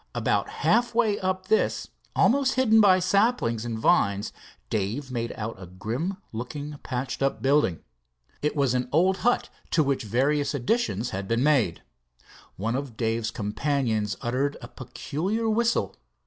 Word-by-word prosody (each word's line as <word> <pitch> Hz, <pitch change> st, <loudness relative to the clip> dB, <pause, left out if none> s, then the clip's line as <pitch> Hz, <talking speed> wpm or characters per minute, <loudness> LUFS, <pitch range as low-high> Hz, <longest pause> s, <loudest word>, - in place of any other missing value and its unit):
About -, -, 0 dB
half 240 Hz, -1 st, +1 dB
way 220 Hz, -4 st, +2 dB
up 185 Hz, 0 st, -2 dB
this, 220 Hz, +1 st, +1 dB, 0.3 s
almost 270 Hz, +1 st, +3 dB
hidden 225 Hz, -4 st, +5 dB
by 190 Hz, -3 st, +6 dB
saplings 185 Hz, -, +1 dB
and 115 Hz, -2 st, -3 dB
vines, 100 Hz, -1 st, +2 dB, 0.4 s
Dave 110 Hz, +7 st, -2 dB
made 115 Hz, -2 st, -2 dB
out 110 Hz, -2 st, -5 dB
a 90 Hz, -, -8 dB
grim 115 Hz, -, -4 dB
looking 145 Hz, +6 st, -6 dB
patched 130 Hz, +1 st, -4 dB
up 135 Hz, 0 st, +1 dB
building. 135 Hz, -, +2 dB, 0.6 s
It 150 Hz, +1 st, 0 dB
was 140 Hz, -4 st, +2 dB
an 125 Hz, 0 st, -1 dB
old 185 Hz, +5 st, +3 dB
hut 245 Hz, +5 st, +1 dB, 0.2 s
to 160 Hz, -, +3 dB
which 140 Hz, -1 st, 0 dB
various 140 Hz, +6 st, +1 dB
additions 125 Hz, -, 0 dB
had 95 Hz, +1 st, -4 dB
been 115 Hz, +3 st, +1 dB
made. 130 Hz, -, +2 dB, 0.7 s
One 115 Hz, +5 st, -2 dB
of 135 Hz, -4 st, -5 dB
Dave's 115 Hz, -1 st, 0 dB
companions 110 Hz, -1 st, -1 dB
uttered 135 Hz, +4 st, -1 dB
a -, -, -9 dB
peculiar 165 Hz, -, -3 dB
whistle. 235 Hz, +2 st, +1 dB
135 Hz, 150 wpm, -26 LUFS, 115-185 Hz, 0.7 s, by